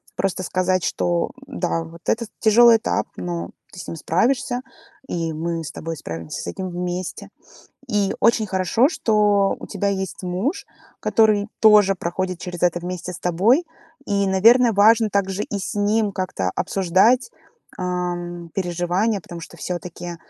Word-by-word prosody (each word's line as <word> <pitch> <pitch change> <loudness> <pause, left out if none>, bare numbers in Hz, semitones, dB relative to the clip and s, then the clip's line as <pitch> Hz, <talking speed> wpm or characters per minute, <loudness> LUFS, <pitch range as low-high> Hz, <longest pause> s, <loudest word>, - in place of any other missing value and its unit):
Просто 185 -1 -1
сказать, 185 0 0
что, 175 -1 0 0.2
да, 170 -2 -2
вот 165 +1 -12
это 230 +1 0
тяжелый 230 +1 +6
этап, 220 - -1
но 175 -1 -4 0.2
ты 180 - -10
с - - -8
ним 165 - -6
справишься 245 - 0 0.5
и 165 -2 -2
мы 165 +1 -3
с 150 - -6
тобой 165 0 -6
справимся 80 - -6
с - - -7
этим 185 - -4
вместе. 180 0 -4 0.6
И 205 -3 +1
очень 230 -1 +3
хорошо, 190 +7 +2
что 210 - +2
у - - -9
тебя 200 - -2
есть 190 -1 -3
муж, 185 - -2 0.3
который 215 -2 +3
тоже 210 -3 +6
проходит 185 0 -3
через 175 -1 -7
это 175 0 +2
вместе 180 0 -5
с - - -8
тобой. 205 - +2 0.4
И, 200 -1 +1
наверное, 230 +6 +5
важно 220 +2 +5
также 195 0 0
и 205 - -4
с 195 - -5
ним 205 0 +1
как-то 185 - -2
обсуждать, 195 - +2 0.5
а, 180 -1 -1 0.4
переживания, 185 +3 0
потому 170 0 -9
что - - -11
всё-таки, 175 -1 -6
190 Hz, 150 wpm, -22 LUFS, 175-215 Hz, 0.6 s, тяжелый